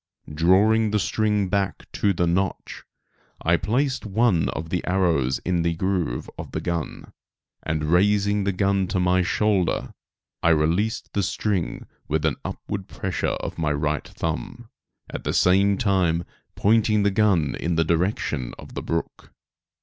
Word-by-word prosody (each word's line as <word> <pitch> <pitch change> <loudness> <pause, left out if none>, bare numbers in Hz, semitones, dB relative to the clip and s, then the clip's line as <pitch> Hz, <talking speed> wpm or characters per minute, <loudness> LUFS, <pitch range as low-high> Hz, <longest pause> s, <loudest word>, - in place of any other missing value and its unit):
Drawing 100 +8 +4
the 105 - +1
string 105 0 +1
back 100 0 -1
to 100 - +1
the 90 -2 +1
notch, 95 +3 -2 0.6
I 85 +1 +4
placed 125 +10 0
one 105 -4 +2
of 80 0 -5
the 90 - -1
arrows 85 -9 +2
in 90 -1 +1
the 85 0 0
groove 90 -8 -1
of - - -8
the - - -1
gun 85 -2 -4 0.5
and, 80 -1 -2
raising 100 +5 +2
the 100 - +1
gun 95 0 +1
to 95 - -1
my 90 +1 +3
shoulder, 100 -1 0 0.5
I - - +3
released 85 +8 +1
the 100 - +1
string 95 -1 -2 0.2
with 80 0 0
an 80 - +1
upward 100 -2 -5
pressure 95 -1 -3 0.2
of - - -6
my 75 -2 +1
right 75 +1 -1
thumb, 120 - -5 0.4
at - - -7
the - - -1
same 100 +2 +4
time 90 -5 +1 0.3
pointing 105 0 +3
the 100 - +3
gun 95 -7 +2
in 85 0 -1
the 80 0 +2
direction 80 - -1
of - - -12
the - - -4
brook. 85 0 -4
95 Hz, 155 wpm, -24 LUFS, 85-100 Hz, 0.6 s, Drawing